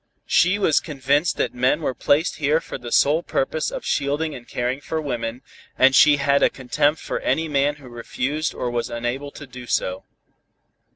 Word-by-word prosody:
She 185 +4 +3
was 175 -7 +3
convinced 145 +2 0
that - - -1
men 125 +5 +1
were 130 - -1
placed 145 +6 +1
here 150 +1 +2
for 165 - -8
the 120 -1 -8
sole 150 +7 +3
purpose 155 -1 -1
of - - -7
shielding 145 +3 -1
and 120 -3 -10
caring 125 +3 -2
for 160 +2 -3
women, 120 -4 -4 0.3
and 135 +1 +5
she 150 +1 +6
had 140 0 +2
a - - +5
contempt 145 +4 0
for - - -4
any 160 0 0
man 145 0 +1
who 140 -3 -14
refused 130 +5 -3
or 125 - -3
was 120 -1 -2
unable 120 +4 -3
to 145 - -11
do 125 -1 -11
so. 95 -3 -1
140 Hz, 185 wpm, -22 LUFS, 125-150 Hz, 0.3 s, she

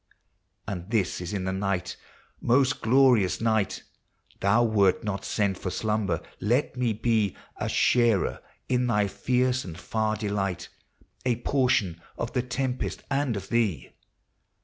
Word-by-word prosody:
And 90 -1 -5
this 105 -7 0
is 90 - -5
in 100 -3 -2
the 95 0 -1
night: 95 -1 -2 0.3
— - - -35
most 135 +2 +3
glorious 115 -7 +4
night! 110 -3 0 0.6
Thou 110 +5 +3
wert 100 -5 +3
not 100 -2 -3
sent 100 -3 0
for 95 - -3
slumber! 105 -4 -1 0.2
let 120 +6 +1
me 125 -2 +1
be 110 -2 +1 0.2
A - - -2
sharer 120 -5 +2 0.3
in 125 -1 +1
thy 105 -3 +2
fierce 125 +5 0
and 85 -3 -8
far 110 +3 -1
delight, 100 -4 -2 0.3
— - - -30 0.2
A 120 - +3
portion 115 -11 +1 0.2
of 115 - -4
the 125 - +1
tempest 125 +1 -3
and 135 -5 0
of 95 0 -7
thee! 105 - 0
110 Hz, 150 wpm, -27 LUFS, 95-125 Hz, 0.6 s, glorious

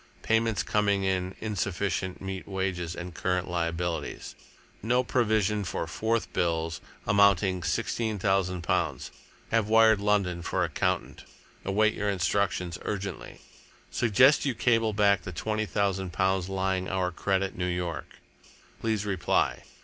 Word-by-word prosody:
Payments 115 -1 +1
coming 100 -2 +1
in 95 -1 -1
insufficient 95 -3 -2
meet 95 -1 -5
wages 95 -3 -2
and 90 0 -7
current 90 +1 -1
liabilities. 85 -1 -3 0.5
No 125 +4 +2
provision 110 -4 +1
for 90 - -3
4th 115 +1 -1
bills, 80 -1 -1 0.2
amounting 100 -2 +4
sixteen 110 +3 -1
thousand 95 -2 0
pounds. 85 -7 -1 0.4
Have 115 -2 +2
wired 110 -1 +6
London 100 -4 +1
for - - -1
accountant. - - -1 0.4
Await 110 +3 +2
your 105 - -1
instructions 90 -2 0
urgently. 100 -3 -5 0.5
Suggest 125 +6 +4
you 135 -4 0
cable 115 -2 +2
back 100 -2 +3
the 90 - -7
twenty 110 +4 -2
thousand 95 -3 -1
pounds 95 -1 +1
lying 95 -1 -1
our 95 -1 0
credit 95 +2 -1
New 90 0 -2
York. 90 -2 -3 0.7
Please 110 -2 0
reply. 95 -4 0
95 Hz, 125 wpm, -28 LUFS, 90-105 Hz, 0.7 s, wired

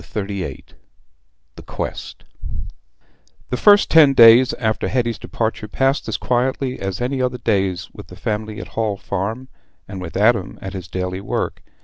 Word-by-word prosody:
Chapter 105 -2 -4
XXXVIII 100 -2 -5 0.9
The - - -9
Quest - - -6 1.3
The 125 - 0
first 205 - +5
ten 150 -4 +7
days 115 +2 +8
after 110 -2 -1
Hetty's 120 -2 -1
departure 110 -1 -3
passed 135 +6 0
as - - -1
quietly 130 +1 -1
as 95 -2 -4
any 130 +2 -1
other 125 0 -1
days 95 -7 0
with - - -11
the - - -12
family 110 0 -4
at - - -6
the - - -17
Hall 110 -3 -1
Farm, 105 +8 -4 0.4
and 95 -2 -7
with 90 0 -6
Adam 105 -2 +2
at 95 0 -7
his 90 -3 -7
daily 90 +1 -4
work. 100 - -3
110 Hz, 160 wpm, -20 LUFS, 95-125 Hz, 1.3 s, days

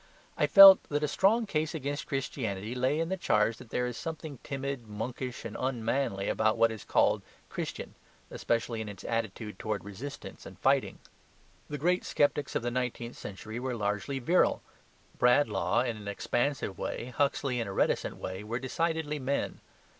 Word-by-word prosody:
I - - +2
felt 195 -1 +11
that 145 0 0
a - - +2
strong 210 +9 +3
case 155 -4 -1
against 145 0 -3
Christianity 115 -6 -3
lay 130 +4 +1
in 165 0 -1
the 190 - -1
charge 110 - +2
that 115 - -13
there 125 - 0
is 125 -1 -4
something 155 -3 -6
timid, 135 -4 -4
monkish, 120 +4 -5
and 105 - -6
unmanly 120 -4 -1
about 110 0 +2
all - - -7
that 115 - +5
is 110 -3 -7
called - - +2 0.3
"Christian," - - -5 0.4
especially 115 -1 -1
in 110 - -5
its 100 -2 -10
attitude 110 -3 -3
towards 110 -2 -3
resistance 120 +8 -8
and - - -12
fighting. - - +2 0.7
The 150 - -3
great 180 +5 +1
sceptics 145 -1 +1
of - - 0
the 120 - -1
nineteenth 125 -1 -3
century 110 +4 -7
were 130 0 -2
largely 105 +5 -2
virile. 165 +8 +2 0.6
Bradlaugh 125 +1 +3
in 120 -3 -2
an 105 -1 -9
expansive 120 +1 -1
way, 125 +1 -4
Huxley, 140 -3 +1
in 115 - -2
a - - -4
reticent - - 0
way, 95 +2 -5
were 115 +3 -3
decidedly 155 +3 -1
men. 140 +1 -2
125 Hz, 170 wpm, -30 LUFS, 110-145 Hz, 0.7 s, felt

